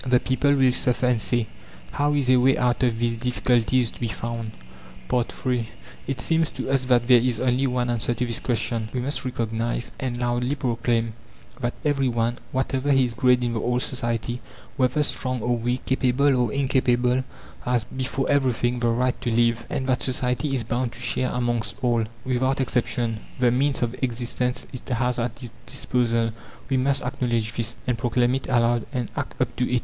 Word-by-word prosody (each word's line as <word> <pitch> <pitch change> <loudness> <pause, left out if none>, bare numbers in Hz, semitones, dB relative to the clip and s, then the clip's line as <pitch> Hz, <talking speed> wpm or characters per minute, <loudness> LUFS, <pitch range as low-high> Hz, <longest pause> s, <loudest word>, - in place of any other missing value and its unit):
The 125 -1 +3
people 135 +3 +2
will 130 -2 +4
suffer 125 0 +1
and 125 -3 +2
say: 120 +1 +2 0.5
"How 145 +1 +1
is 140 -3 +1
a 130 0 +6
way 130 +2 +4
out 125 0 +1
of 120 -3 +2
these 115 0 +1
difficulties 125 0 +1
to - - -15
be 120 - -1
found?" 115 0 -4 0.6
III 125 -1 -1 0.4
It 135 - -2
seems 165 -1 +1
to - - -4
us 135 -1 +2
that 125 -2 +3
there 125 -1 +7
is 120 -2 +1
only 130 +1 +2
one 125 -1 0
answer 120 0 0
to 125 - -1
this 115 -2 -1
question: 115 -2 -1
We 130 - -1
must 140 +4 -2
recognize, 115 -1 -2
and 125 -2 -2
loudly 120 +2 0
proclaim, 115 -3 0 0.5
that 120 0 -2
every 140 -2 +2
one, 120 0 0
whatever 130 +1 0
his 130 -3 +3
grade 125 +1 +3
in 120 -1 0
the 115 - -1
old 125 +1 0
society, 120 -1 -2 0.3
whether 130 +2 +2
strong 130 -3 -1
or 120 0 +2
weak, 120 +2 -2
capable 130 +1 +2
or 120 -3 +1
incapable, 130 -2 +2 0.4
has, 125 -2 +1
before 130 +3 -3
everything, 125 -3 +1
THE 120 - +1
RIGHT 125 +2 +1
TO 120 - -1
LIVE, 115 0 +2
and 135 -3 -2
that 130 -2 +1
society 130 +2 0
is 125 - -1
bound 120 +2 -2
to 120 - -11
share 125 +1 0
amongst 120 -3 -1
all, 120 -2 +2 0.2
without 130 +1 +1
exception, 120 -3 0 0.2
the 125 -2 +3
means 135 +1 +1
of 120 0 -1
existence 125 0 -1
it 125 - -7
has 125 0 0
at 120 +1 -3
its 120 - -6 0.2
disposal. 120 -3 0 0.4
We 135 - +2
must 135 +2 +1
acknowledge 120 -3 -1
this, 115 0 -2
and 125 -2 -1
proclaim 120 0 +2
it 135 0 -3
aloud, 120 -2 +2
and 125 -4 -3
act - - -4
up - - 0
to 125 0 0
it. 125 - +3
125 Hz, 190 wpm, -24 LUFS, 120-130 Hz, 0.6 s, there